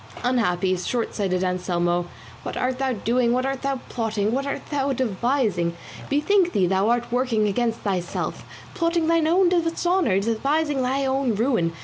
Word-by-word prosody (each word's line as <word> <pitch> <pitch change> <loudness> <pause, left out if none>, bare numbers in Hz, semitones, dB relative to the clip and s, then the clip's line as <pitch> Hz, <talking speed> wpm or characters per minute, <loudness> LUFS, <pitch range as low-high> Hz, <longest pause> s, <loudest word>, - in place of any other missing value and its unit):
Unhappy, 195 -7 +1
shortsighted 190 -2 -1
Anselmo, 175 -1 0 0.3
what - - -5
art 255 0 -1
thou 265 -1 0
doing, 235 +2 +1
what 255 +1 0
art 270 0 -2
thou 275 -1 -1
plotting, 220 -3 -1
what 275 +3 -1
art 280 - -4
thou 280 -1 0
devising? 220 -7 0 0.3
Bethink 350 +6 +2
thee 190 - +3
thou 190 +4 +2
art 240 0 0
working 240 -4 +1
against 230 +3 -1
thyself, 185 -4 -3 0.3
plotting 335 -2 +1
thine 330 -1 +2
own 360 +3 +4
dishonour, 340 - +1
devising 275 +7 0
thine 265 +2 0
own 265 -3 0
ruin. 225 -7 +1
245 Hz, 150 wpm, -23 LUFS, 200-275 Hz, 0.3 s, own